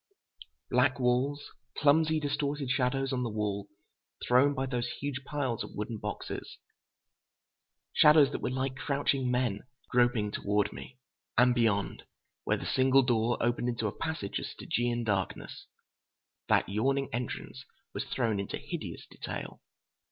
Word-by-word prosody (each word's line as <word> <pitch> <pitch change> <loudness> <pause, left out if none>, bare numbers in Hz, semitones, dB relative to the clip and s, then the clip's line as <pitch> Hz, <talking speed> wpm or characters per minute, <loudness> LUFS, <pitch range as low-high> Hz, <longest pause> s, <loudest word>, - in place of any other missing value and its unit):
Black 125 +1 +3
walls, 130 +4 +1 0.3
clumsy, 155 +2 +4
distorted 145 -2 -1
shadows 135 +1 +1
on 125 - 0
the 120 - -1
wall, 105 -2 -2 0.6
thrown 135 +4 +5
by 135 0 -1
those 125 -2 -2
huge 140 -2 -3
piles 135 -6 -2
of - - -10
wooden 105 +1 -4
boxes. - - -5 1.4
Shadows 150 -2 +7
that - - -4
were - - -1
like 130 +1 -2
crouching 140 -2 0
men, 125 -5 +1 0.3
groping 120 -4 +3
toward 105 0 0
me. 125 - -10 0.4
And 125 0 +6
beyond, 110 -5 +1 0.4
where - - +2
the - - -7
single 135 +1 +4
door 120 -1 +2
opened 120 +1 +1
into 115 -2 -2
a 105 - -2
passage 160 -12 -3
of - - -5
Stygian 120 0 -1
darkness, 100 -4 -2 0.8
that - - +4
yawning 135 +7 +1
entrance 120 +1 -4 0.3
was - - -3
thrown 115 -5 0
into 100 - -3
hideous - - -6
detail. - - -7
125 Hz, 135 wpm, -30 LUFS, 115-135 Hz, 1.4 s, Shadows